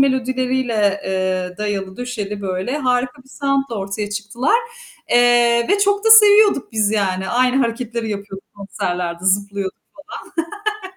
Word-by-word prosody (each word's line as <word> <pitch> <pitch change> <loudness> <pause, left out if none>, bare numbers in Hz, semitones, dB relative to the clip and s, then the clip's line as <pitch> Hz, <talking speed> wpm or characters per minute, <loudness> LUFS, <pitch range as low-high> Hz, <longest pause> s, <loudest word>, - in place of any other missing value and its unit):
melodileriyle, 255 -5 0
eee, 185 -1 -2
dayalı 195 -2 -3
döşeli, 210 -5 -5
böyle, 190 +9 -3
harika 250 -1 -1
bir 265 - -23
sound'la 275 -3 -1
ortaya 200 +2 -4
çıktılar. 225 - 0 0.5
Eee, 240 -1 +4
ve 405 +1 +3
çok 405 +1 +1
da 445 - +4
seviyorduk 420 - +6
biz 215 -2 +1
yani. 190 -3 -1
Aynı 250 +1 +2
hareketleri 230 -1 -3
yapıyorduk 200 -1 -7
konserlerde, 180 -3 -4
zıplıyorduk 200 0 -1 1.0
falan 380 - -9
230 Hz, 125 wpm, -19 LUFS, 195-255 Hz, 1.0 s, seviyorduk